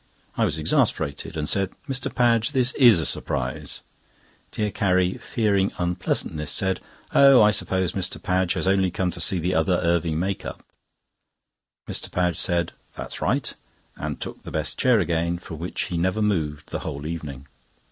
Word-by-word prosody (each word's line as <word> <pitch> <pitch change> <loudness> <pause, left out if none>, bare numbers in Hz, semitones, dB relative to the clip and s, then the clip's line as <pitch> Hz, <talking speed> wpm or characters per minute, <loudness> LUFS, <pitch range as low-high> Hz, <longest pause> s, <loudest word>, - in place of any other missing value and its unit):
I - - +2
was 75 - -1
exasperated, 75 -1 0
and 75 -1 -2
said: 95 0 +1
"Mr. 135 -2 -1
Padge, 120 0 +2
this 130 -1 +2
is 120 -8 +7
a 80 - -1
surprise." 65 -2 -3 0.7
Dear 105 -1 -2
Carrie, 95 -2 +1
fearing 100 -4 +1
unpleasantness, 85 -3 -1
said: 95 -1 0 0.3
"Oh! 135 -2 +7
I 105 - +6
suppose 95 -4 +1
Mr. 95 -2 -3
Padge 90 -1 +1
has - - -2
only 95 -1 +3
come 90 0 -1
to 85 0 -4
see 95 - +3
the 90 +2 -1
other 80 +3 +2
Irving 85 -2 +1
make 95 +3 -2
up." - - -8 1.2
Mr. - - -2
Padge 90 -2 0
said: 85 -1 +1 0.2
"That's - - -6
right," - - 0 0.4
and - - -5
took - - -6
the - - -9
best - - -2
chair 125 -3 +3
again, 85 -1 0
from 85 -3 -9
which 85 +2 -4
he 85 - -3
never 95 +5 +1
moved 80 -8 -1
the - - -2
whole 70 +1 -6
evening. 75 -5 -6
90 Hz, 165 wpm, -24 LUFS, 85-100 Hz, 1.2 s, is